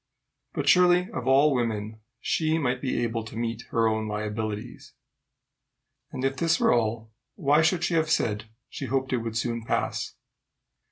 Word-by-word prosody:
But - - -3
surely 180 0 +5
of 125 0 -5
all 140 +3 +5
women 110 -3 -2 0.2
she 160 0 +1
might 125 -5 -1
be 130 -3 -1
able 115 -1 -2
to 110 - -10
meet 115 0 -3
her 115 -1 +2
own 110 0 0
liabilities. 105 0 -4 1.2
And 130 0 -3
if 135 0 0
this 165 -1 +2
were - - +4
all, 115 -1 -1 0.2
why 150 -3 +3
should 165 +2 +2
she 175 - 0
have 160 -1 +2
said 110 -8 0 0.2
she - - -6
hoped 130 +1 -1
it - - +3
would 115 -1 -3
soon 115 0 -1
pass? - - -2
120 Hz, 165 wpm, -26 LUFS, 110-150 Hz, 1.2 s, surely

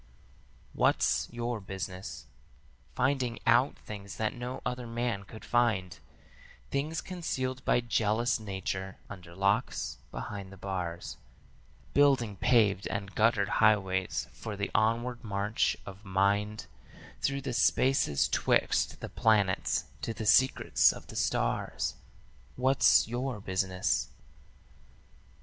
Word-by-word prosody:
"'What's - - +2
your 120 -1 -3
business?' 95 -1 -6 0.7
Finding 130 -2 0
out 120 +4 +4
things 100 -2 -8
that 110 -1 -1
no 125 +1 -5
other 125 -1 -3
man 115 -4 -2
could 110 +2 -11
find, 110 -7 +1 0.7
Things 150 +4 -1
concealed 130 -8 -3
by 120 - +3
jealous 115 +1 +1
Nature 95 -2 -4
under 90 -4 -10
locks, 100 +2 0
behind 95 +10 -6
the 95 - -11
bars; 90 -3 -4 0.8
Building 135 -7 +3
paved 105 -4 +3
and 100 -1 -4
guttered 110 -2 +3
highways 95 -4 +2
for 105 +7 -6
the 100 - -2
onward 120 +3 +1
march 105 0 0
of 95 +2 -10
mind 100 +2 0 0.6
Through 140 0 0
the 130 -2 -4
spaces 125 - +3
'twixt - - +1
the - - -5
planets 105 -4 +2 0.2
to 115 - -3
the 110 - -5
secrets 130 +5 +5
of - - -10
the - - -11
stars. - - -1 0.6
'What's 130 -2 +4
your 120 0 -3
business?' 95 -1 -1
110 Hz, 115 wpm, -30 LUFS, 95-120 Hz, 0.8 s, secrets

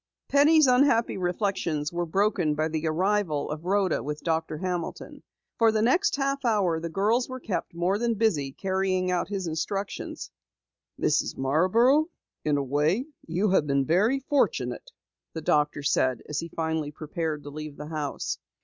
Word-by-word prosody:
Penny's 300 +2 +6
unhappy 250 -2 +3
reflections 175 -5 -1
were 175 0 -2
broken 180 -4 +1
by 155 +1 0
the 160 0 -2
arrival 175 -3 0
of 155 +2 -6
Rhoda 195 -2 +1
with 150 +1 -5
Doctor 160 -2 -1
Hamilton. 180 0 -4 0.4
For 225 -1 +5
the 215 0 +1
next 360 - +3
half 275 0 -1
hour 200 -8 +2
the 165 +1 -4
girls 215 +9 +1
were 255 0 -6
kept 205 -7 -4
more 180 +4 0
than 235 -1 0
busy 180 -11 +1
carrying 190 +2 -1
out 180 -2 0
his 195 -2 -3
instructions. 185 +5 -4 0.7
"Mrs. - - +1
Marborough, 220 - +3 0.4
in 150 -1 +1
a 140 - 0
way 150 - +1 0.2
you 185 +5 +1
have 155 -6 +3
been 140 -1 +1
very 210 - +2
fortunate," 290 - 0 0.4
the 160 - -5
doctor 150 -1 +1
said 130 -3 +1
as 150 - -2
he 165 - -4
finally 160 -2 -2
prepared 155 0 -4
to 145 - -8
leave 155 0 -7
the 150 +1 -7
house. 150 -3 -3
180 Hz, 160 wpm, -26 LUFS, 155-215 Hz, 0.7 s, Penny's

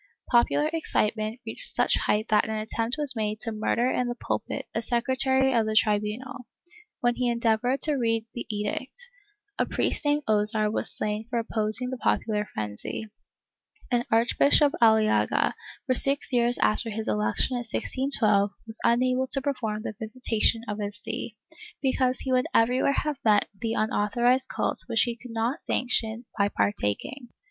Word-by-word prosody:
Popular 245 +5 +3
excitement 220 -7 -1
reached - - 0
such - - +3
height 215 +2 0
that 215 - +3
an 220 - -2
attempt 225 +2 -2
was 295 -4 -1
made 215 -1 -2
to 230 - +1
murder 220 +3 0
in 250 - 0
the 240 - -3
pulpit - - -4
a 225 - -1
secretary 260 +3 +1
of 225 -2 +2
the 215 - -2
tribunal, 215 +4 0 0.5
when 240 -1 +2
he 250 -1 +1
endeavored 235 +2 +1
to 305 - +3
read 225 -2 0
the 240 - -6
edict; 210 - -4 0.6
a - - +1
priest - - -1
named 290 0 +1
Ozar 215 0 +2
was - - 0
slain 210 +1 -3
for 240 - -2
opposing 225 +2 +2
the 260 - -5
popular 210 -4 0
frenzy, 105 - -5 0.8
and 240 -1 +2
Arch 230 +2 +2
bishop 285 0 +5
Aliaga, 220 -1 +3 0.3
for 260 - +1
six 275 +2 +2
years 240 0 +2
after 225 +2 +1
his 220 0 -4
election 105 - 0
in 245 - -1
1612, 230 -4 +1 0.2
was 220 0 -7
unable 255 +2 +2
to 275 - +1
perform 225 -7 -2
the - - -4
visitation 225 0 0
of 210 0 -4
his 205 0 -4
see, - - -6 0.4
because 260 -1 0
he 265 - -3
would 255 0 +2
everywhere 250 +4 +3
have 300 0 -1
met 210 -2 +3
with 195 - -28
the 225 -1 -1
unauthorized 240 +4 +1
cult - - -1
which 225 - +2
he 240 -1 -2
could 245 +2 -12
not 230 +6 -2
sanction 235 -2 -1
by 200 0 +3
partaking. 205 - -2
230 Hz, 165 wpm, -26 LUFS, 215-255 Hz, 0.8 s, bishop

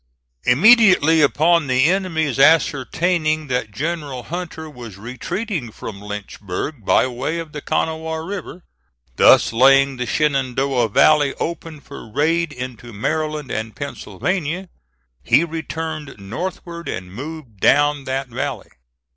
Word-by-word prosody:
Immediately 180 - +6
upon 155 +2 +3
the 130 0 +3
enemy's 160 -7 0
ascertaining 155 +2 +2
that 125 -3 -1
General 145 0 -4
Hunter 160 -1 -6
was 120 -9 -10
retreating 130 - -4
from 100 -2 -8
Lynchburg 105 +4 -6
by - - +3
way 130 +6 -3
of 165 -2 -6
the 150 - -7
Kanawha 160 +1 -2
River, 185 -2 -7 0.5
thus - - +6
laying 135 +2 +5
the 125 -1 -3
Shenandoah 135 -4 +1
Valley 145 +5 +4
open 165 -2 -5
for 140 -7 -11
raid 165 +5 +1
into 125 -3 -7
Maryland 150 +5 -2
and 110 0 -4
Pennsylvania, 180 +4 -3 0.5
he 160 - +4
returned 160 -2 -5
northward 170 - -6
and 90 0 -6
moved 135 -3 -8
down 145 +2 +3
that 135 0 -2
valley. 125 +2 -4
145 Hz, 120 wpm, -20 LUFS, 125-165 Hz, 0.5 s, Immediately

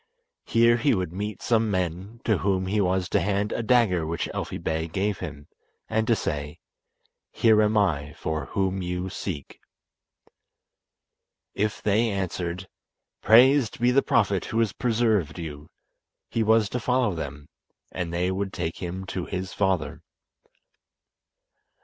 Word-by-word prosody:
Here 115 +1 +4
he 140 +1 +2
would 90 -3 -3
meet 105 +1 -5
some 115 -2 +2
men, 95 +4 -3
to 110 -6 +2
whom 95 -1 0
he 105 +3 +1
was 95 -1 +1
to - - +2
hand 100 +1 0
a - - -1
dagger 110 -8 +3
which 80 +2 -2
Elfi - - -4
Bey 80 0 -2
gave 95 +4 -1
him, 75 -5 -7 0.4
and 110 0 0
to 115 - +4
say 75 -6 -3 0.7
"Here 110 -2 +4
am 105 0 +2
I 75 -8 +1
for 80 -1 -3
whom 95 -1 -1
you 90 +1 -3
seek." 80 -9 -6 1.9
If 105 +1 -2
they 110 +3 +2
answered: 95 -2 -3 0.5
"Praised 130 +4 +5
be 120 +1 +3
the 135 +2 +4
Prophet 100 -7 +1
who 110 - -3
has 115 -4 +2
preserved 110 - +1
you," 75 -3 -7 0.6
he 115 - 0
was 110 -1 +4
to 125 - -2
follow 125 -3 +1
them, 75 -3 -6 0.4
and 90 -2 -4
they 90 +2 0
would 95 +1 -2
take 80 - -3
him 95 +1 -5
to 95 -1 -4
his 95 0 -4
father. 95 -3 0
95 Hz, 145 wpm, -25 LUFS, 90-110 Hz, 1.9 s, Praised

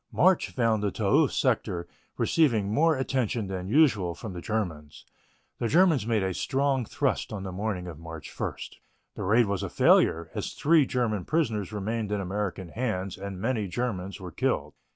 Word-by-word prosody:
March 185 0 +3
found 115 -4 +1
the 105 - +1
Toul - - +3
sector 85 -1 0 0.3
receiving 110 -11 +2
more 160 +3 +3
attention 125 -4 -1
than 95 -1 -5
usual 105 - +3
from 110 -5 -7
the 90 - -6
Germans. 85 -10 -4 0.5
The 120 - 0
Germans 160 - +4
made 110 -4 +1
a 95 -1 -1
strong 135 +3 0
thrust - - -1
on 100 -3 -5
the 95 - -5
morning 95 -1 -3
of 85 -3 -8
March 80 -1 -9
1. - - -2 0.6
The - - -7
raid 115 +5 +4
was 100 -2 -2
a - - -3
failure, 80 0 +3
as - - -4
three 155 -2 +4
German 110 -6 0
prisoners 115 - 0
remained 105 +1 -3
in 105 - 0
American 95 -1 -3
hands 100 -4 -2
and 95 -1 -7
many 110 -1 -1
Germans 95 -2 -3
were 90 -2 -8
killed. - - -1
105 Hz, 175 wpm, -27 LUFS, 95-125 Hz, 0.6 s, Germans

